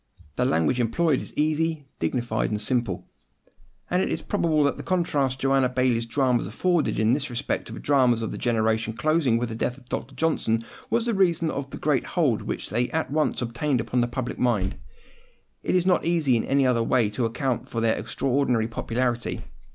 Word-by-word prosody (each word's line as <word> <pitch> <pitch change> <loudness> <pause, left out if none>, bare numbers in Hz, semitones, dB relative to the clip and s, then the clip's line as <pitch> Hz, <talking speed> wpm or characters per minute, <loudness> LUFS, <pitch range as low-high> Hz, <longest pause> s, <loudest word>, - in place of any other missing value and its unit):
The - - +1
language 80 +10 +2
employed 135 +5 +2
is - - -8
easy, 155 0 0
dignified, 120 -3 -1
and 105 - -2
simple: 115 -4 -1 0.8
and 180 +1 +1
it - - 0
is - - -3
probable 160 -7 +1
that 140 - +1
the - - -5
contrast 145 -8 0
Joanna 135 -1 +3
Baillie's 125 -2 +1
dramas 125 -3 +1
afforded 170 - 0
in 110 +2 +3
this 140 +1 -1
respect 125 +3 -2
to - - -8
the - - -7
dramas 125 -5 +3
of 110 - -3
the - - -5
generation 110 -1 +1
closing 145 -1 +2
with 120 0 -2
the 110 - -5
death 125 +2 -2
of 130 - -17
Dr. 130 +3 -4
Johnson, 115 -8 0 0.2
was 230 +1 +1
the 235 - 0
reason 170 -5 +2
of 140 0 -4
the - - -7
great 145 -4 0
hold 140 -11 +2
which - - -5
they 120 +3 0
at 160 -3 -2
once 150 -4 0
obtained 120 +3 -1
upon 120 +2 0
the 120 - +1
public 125 0 -4
mind. 110 -7 +1 0.9
It - - 0
is 180 -1 +2
not 180 -2 +3
easy 165 -7 +2
in 115 - 0
any 135 0 +2
other 125 -2 +2
way 115 -1 +2
to 120 +3 -1
account 125 +2 -2
for 115 - -3
their 115 -1 +2
extraordinary 125 -4 0
popularity. 120 +1 -2
130 Hz, 200 wpm, -25 LUFS, 115-150 Hz, 0.9 s, Joanna